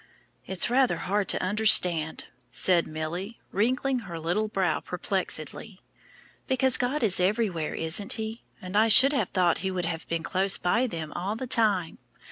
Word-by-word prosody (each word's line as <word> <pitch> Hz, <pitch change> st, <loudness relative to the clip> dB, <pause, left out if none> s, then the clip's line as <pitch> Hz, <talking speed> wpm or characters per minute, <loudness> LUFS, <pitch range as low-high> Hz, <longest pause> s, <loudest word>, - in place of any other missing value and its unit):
"It's 190 Hz, -2 st, 0 dB
rather 260 Hz, 0 st, +2 dB
hard 200 Hz, 0 st, -2 dB
to -, -, -1 dB
understand," 180 Hz, -6 st, +4 dB, 0.3 s
said 170 Hz, +6 st, +1 dB
Milly, 170 Hz, +8 st, -6 dB
wrinkling 255 Hz, +5 st, 0 dB
her 185 Hz, -7 st, -8 dB
little 175 Hz, +7 st, -1 dB
brow 215 Hz, -, -1 dB
perplexedly, -, -, -3 dB, 0.7 s
"because 260 Hz, -1 st, +1 dB
God 250 Hz, +3 st, -2 dB
is 195 Hz, -5 st, +3 dB
everywhere, 185 Hz, -4 st, -1 dB
isn't 165 Hz, +5 st, 0 dB
He? 220 Hz, +1 st, -6 dB, 0.2 s
and 185 Hz, +1 st, -8 dB
I 215 Hz, +2 st, +4 dB
should 260 Hz, +6 st, +7 dB
have 235 Hz, -10 st, -1 dB
thought 180 Hz, -3 st, +1 dB
He 190 Hz, -, -3 dB
would 185 Hz, -2 st, -3 dB
have 165 Hz, -1 st, -5 dB
been 165 Hz, -1 st, -3 dB
close 190 Hz, +1 st, +2 dB
by 230 Hz, +8 st, 0 dB
them 165 Hz, -7 st, -6 dB
all 195 Hz, +4 st, -4 dB
the 260 Hz, -, -5 dB
time. 210 Hz, -9 st, 0 dB
195 Hz, 160 wpm, -26 LUFS, 175-225 Hz, 0.7 s, should